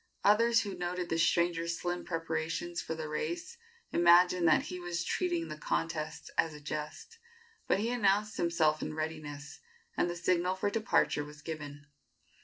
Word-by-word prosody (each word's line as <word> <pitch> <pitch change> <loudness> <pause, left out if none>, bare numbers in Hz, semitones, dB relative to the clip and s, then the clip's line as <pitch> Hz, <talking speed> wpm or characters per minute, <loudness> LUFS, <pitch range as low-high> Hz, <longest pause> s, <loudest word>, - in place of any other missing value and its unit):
Others 230 +2 +5
who 200 -2 -4
noted 180 0 -3
the 165 - 0
stranger's 170 0 +2
slim 175 0 -3
preparations 165 +1 -2
for 160 - -4
the 160 -1 -5
race 345 - -4 0.3
imagined 175 0 +5
that 155 - +5
he 180 - -6
was 175 -1 -3
treating 345 - -1
the - - -6
contest 155 0 -3
as 160 -2 +2
a - - -9
jest; 150 - -6 0.5
but - - +3
he 225 +3 0
announced 210 -2 +2
himself 160 -3 +2
in - - -4
readiness, 155 -2 -5 0.4
and 175 - +1
the 175 - -3
signal 180 +1 +1
for 200 +2 -1
departure 215 -8 +1
was 150 0 -12
given. 145 -2 -7
170 Hz, 160 wpm, -32 LUFS, 155-185 Hz, 0.5 s, Others